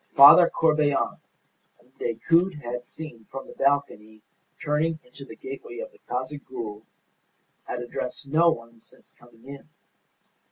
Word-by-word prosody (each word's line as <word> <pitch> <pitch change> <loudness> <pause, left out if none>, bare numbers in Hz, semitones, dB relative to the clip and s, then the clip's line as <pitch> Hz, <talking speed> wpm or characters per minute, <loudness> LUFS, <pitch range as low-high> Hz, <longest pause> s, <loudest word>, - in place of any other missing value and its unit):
Father 160 +5 +10
Corbelan, 150 -3 +1 0.6
whom 125 +1 -28
Decoud 165 +10 +1
had 125 -4 -5
seen 125 -5 -10
from 135 - -7
the - - -12
balcony 110 -6 -1 0.4
turning 155 +2 0
into 250 - -13
the - - -11
gateway 400 0 -9
of - - -6
the 445 - -23
Casa 130 +4 -3
Gould, 110 -6 -8 0.8
had 125 - -4
addressed 125 +3 -5
no 165 +4 +4
one 115 -6 -5
since - - -17
coming 120 0 -21
in. 140 +2 -11
140 Hz, 135 wpm, -25 LUFS, 120-160 Hz, 0.8 s, Father